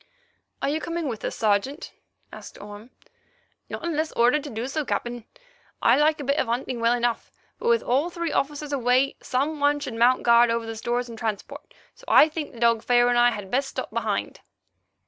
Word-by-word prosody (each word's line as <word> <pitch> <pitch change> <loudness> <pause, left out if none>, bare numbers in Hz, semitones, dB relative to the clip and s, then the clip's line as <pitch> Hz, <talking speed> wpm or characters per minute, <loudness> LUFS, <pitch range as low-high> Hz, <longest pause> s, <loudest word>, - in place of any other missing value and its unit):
"Are - - +1
you 310 +2 -1
coming 335 -1 -3
with 230 -5 -5
us, - - -3
Sergeant?" 220 - -1 0.4
asked - - -11
Orme. 205 +3 -11 0.8
"Not - - -6
unless 315 -1 -1
ordered 250 +5 +3
so 295 - -7
to 230 +1 -4
do, 300 +2 -3
Captain. 240 -3 -3 0.5
I - - +4
like 305 +2 +2
a - - -4
bit 280 +2 0
of - - 0
hunting 240 +1 -2
well 230 +1 +3
enough, 240 -1 -1 0.3
but, 470 - -3
with 465 0 +3
all 275 +8 +1
three 340 -2 -3
officers 290 +1 -2
away, 255 +1 +2
some 285 +4 -1
one 290 0 +2
should 275 -4 -5
mount 240 +3 +3
guard 235 0 +5
over 230 0 -1
the 225 0 -6
stores 240 +2 -2
and 230 -1 -10
transport, 220 -4 -5 0.2
so - - -21
I 310 - +6
think 310 -1 -5
the 235 - -13
dog 230 -1 +3
Pharaoh 240 +1 +3
and 245 - +2
I 240 0 +6
had 205 -5 -6
best 270 +2 0
stop - - -5
behind." - - -2
250 Hz, 205 wpm, -24 LUFS, 235-295 Hz, 0.8 s, I